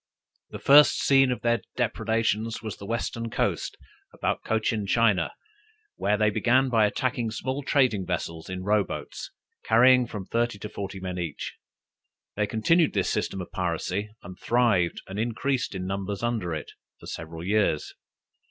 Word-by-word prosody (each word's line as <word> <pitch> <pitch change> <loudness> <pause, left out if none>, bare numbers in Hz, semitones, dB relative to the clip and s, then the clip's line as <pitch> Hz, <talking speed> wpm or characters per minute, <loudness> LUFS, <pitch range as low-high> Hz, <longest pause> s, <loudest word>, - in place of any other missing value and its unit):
The - - -7
first 145 +2 +7
scene 135 -2 +5
of 125 - -3
their 120 0 +1
depredations 115 -1 -1
was 110 -5 -5
the 100 - -9
Western 115 0 -3
coast, - - -1 0.3
about - - -2
Cochin 110 -2 0
China, 105 -5 +2 0.6
where 105 +1 +1
they 105 -1 +3
began 130 +5 +3
by 110 -3 +4
attacking 120 0 -1
small 130 +5 -3
trading 125 -9 +2
vessels 85 -2 -4
in 95 0 -5
row 105 +1 +3
boats, - - -7 0.3
carrying 125 +2 +5
from 105 -5 -6
thirty 120 0 -1
to 105 +1 -7
forty 100 -2 -6
men 90 -1 -4
each. 85 -4 -4 0.8
They 105 0 0
continued 150 - +2
this - - 0
system 95 - -2
of 90 - -9
piracy, 90 +3 -2
and 90 +1 -10
thrived 115 -8 +2
and 95 +2 -6
increased 120 +1 -1
in 90 -1 -4
numbers 100 +2 -3
under 115 -7 -1
it, 75 - -7 0.3
for - - -13
several 80 0 -7
years. 100 -5 +1
110 Hz, 155 wpm, -26 LUFS, 95-120 Hz, 0.8 s, first